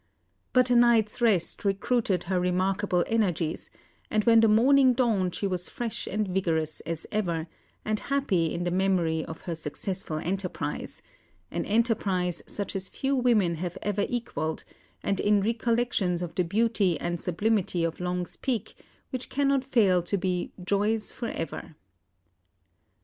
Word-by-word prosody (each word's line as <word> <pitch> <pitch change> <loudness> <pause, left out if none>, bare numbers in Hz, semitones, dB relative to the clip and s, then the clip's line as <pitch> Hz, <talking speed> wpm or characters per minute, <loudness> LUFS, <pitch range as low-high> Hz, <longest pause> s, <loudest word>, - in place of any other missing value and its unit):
But 255 -1 +3
a - - +5
night's 235 -2 +4
rest 200 -8 +2
recruited 200 -1 +1
her 185 +1 0
remarkable 185 +1 +1
energies, 180 -8 -1 0.4
and 215 0 +1
when 230 0 +6
the 225 - +5
morning 255 +4 +5
dawned 215 -8 +1
she - - -2
was 180 -2 -2
fresh 235 -2 -4
and 210 +1 -1
vigorous 165 -5 -1
as 165 -1 -4
ever, 170 -7 -1 0.4
and 215 0 0
happy 195 - 0
in 175 - -2
the 175 - -1
memory 175 -4 +1
of 160 - -8
her 175 - -4
successful 160 +2 -4
enterprise 185 +4 -4 0.5
an - - -2
enterprise 200 -6 +1
such 200 0 -4
as 190 -1 -3
few 275 +1 -1
women 230 -9 +3
have 175 +1 -4
ever 205 -1 0
equalled 160 -10 -3 0.4
and 195 - 0
in 205 0 +3
recollections 230 -5 0
of 175 - -5
the 180 - +1
beauty 200 -1 +1
and 175 -1 -3
sublimity 185 -1 0
of 165 -1 -2
Long's 180 -1 -2
Peak, 235 -6 -2 0.4
which 255 -1 -4
cannot 275 -1 +1
fail 205 -9 +3
to 175 +4 -1
be 180 -1 -1
"joys 210 +3 0
for 235 - -5
ever." 165 -5 -5
195 Hz, 150 wpm, -27 LUFS, 175-225 Hz, 0.5 s, when